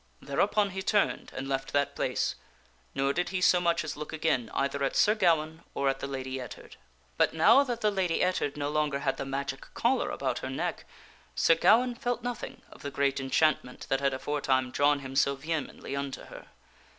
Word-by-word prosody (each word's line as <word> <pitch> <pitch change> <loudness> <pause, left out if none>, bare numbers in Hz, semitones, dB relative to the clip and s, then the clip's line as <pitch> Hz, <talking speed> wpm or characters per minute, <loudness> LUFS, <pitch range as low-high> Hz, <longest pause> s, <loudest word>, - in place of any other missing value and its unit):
Thereupon 200 +8 +1
he 190 +1 -4
turned 205 +1 +1
and 135 - -4
left 135 0 -3
that 145 0 +1
place, - - 0 0.6
nor 135 +1 +1
did 175 +2 -1
he 190 - -2
so 180 -1 +4
much 170 -1 +1
as 155 -2 -4
look 150 0 -7
again 155 -7 0
either 140 0 -1
at 135 - 0
Sir 210 - +5
Gawaine 165 -6 +1
or 140 -1 +1
at 135 0 -1
the 140 - -4
Lady 130 -1 -4
Ettard. 120 -4 -10 0.4
But, - - +2
now 215 - +6
that 240 -4 -4
the 210 -1 +3
Lady 185 -4 +1
Ettard 180 -6 0
no 145 0 -1
longer 150 -2 0
had 135 -1 0
the 135 - -4
magic 135 0 -4
collar 255 +3 +1
about - - -2
her - - -5
neck, - - -3 0.5
Sir - - +5
Gawaine 245 - +4
felt 245 -1 -3
nothing 245 -1 -5
of - - -14
the 140 - -4
great 140 -1 0
enchantment 135 -1 +1
that 135 - +2
had 140 -1 +1
afore 145 +2 -3
time 130 -2 +1
drawn 145 +1 +3
him 135 0 -7
so 140 0 +3
vehemently 150 -1 -4
unto 140 -1 -4
her. - - -12
145 Hz, 200 wpm, -29 LUFS, 135-185 Hz, 0.6 s, now